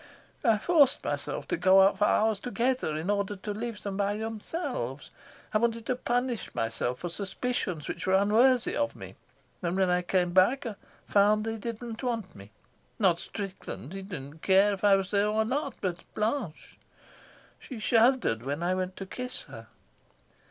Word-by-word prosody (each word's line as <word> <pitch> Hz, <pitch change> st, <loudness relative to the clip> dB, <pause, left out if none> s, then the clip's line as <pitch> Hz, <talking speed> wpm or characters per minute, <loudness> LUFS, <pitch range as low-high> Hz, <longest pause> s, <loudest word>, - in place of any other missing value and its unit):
I 225 Hz, -5 st, +4 dB
forced 285 Hz, +2 st, +3 dB
myself -, -, -3 dB
to -, -, 0 dB
go 190 Hz, +2 st, +6 dB
out 195 Hz, -, +3 dB
for 210 Hz, -, +4 dB
hours 215 Hz, -1 st, +2 dB
together 245 Hz, -7 st, -1 dB
in 160 Hz, +6 st, -1 dB
order 200 Hz, 0 st, -1 dB
to 205 Hz, +2 st, -5 dB
leave 225 Hz, 0 st, -5 dB
them 200 Hz, -1 st, -4 dB
by 205 Hz, 0 st, 0 dB
themselves; 220 Hz, -, -4 dB, 0.4 s
I 215 Hz, -, +4 dB
wanted 230 Hz, 0 st, 0 dB
to 255 Hz, -, 0 dB
punish 245 Hz, -3 st, -2 dB
myself 115 Hz, +2 st, -1 dB
for 175 Hz, -, -5 dB
suspicions 195 Hz, -, -3 dB
which -, -, -5 dB
were 190 Hz, -, +4 dB
unworthy 230 Hz, +6 st, +4 dB
of 290 Hz, 0 st, -1 dB
me; -, -, -9 dB, 0.5 s
and 175 Hz, 0 st, -1 dB
when 190 Hz, -2 st, +3 dB
I 180 Hz, 0 st, +2 dB
came 180 Hz, 0 st, +1 dB
back 235 Hz, +10 st, +4 dB
I 230 Hz, -, -3 dB, 0.3 s
found 210 Hz, +1 st, +3 dB
they 225 Hz, 0 st, -2 dB
didn't 230 Hz, +1 st, -6 dB
want 230 Hz, -7 st, -3 dB
me 100 Hz, +1 st, -12 dB, 0.5 s
not 180 Hz, -5 st, +3 dB
Strickland, 190 Hz, -, -6 dB
he 195 Hz, -, -5 dB
didn't 160 Hz, -6 st, -8 dB
care 195 Hz, +2 st, +4 dB
if 195 Hz, -, -7 dB
I 200 Hz, -1 st, +6 dB
was 195 Hz, -1 st, -2 dB
there 205 Hz, 0 st, +3 dB
or 215 Hz, +1 st, +1 dB
not, 275 Hz, +2 st, -2 dB
but 175 Hz, -3 st, -3 dB
Blanche. 215 Hz, -, -3 dB, 0.8 s
She 260 Hz, -, -9 dB
shuddered 230 Hz, -, +3 dB
when 145 Hz, +6 st, -3 dB
I 180 Hz, +1 st, +1 dB
went 185 Hz, 0 st, -2 dB
to 195 Hz, -, -6 dB
kiss 250 Hz, +6 st, -6 dB
her. -, -, -11 dB
205 Hz, 175 wpm, -28 LUFS, 185-235 Hz, 0.8 s, go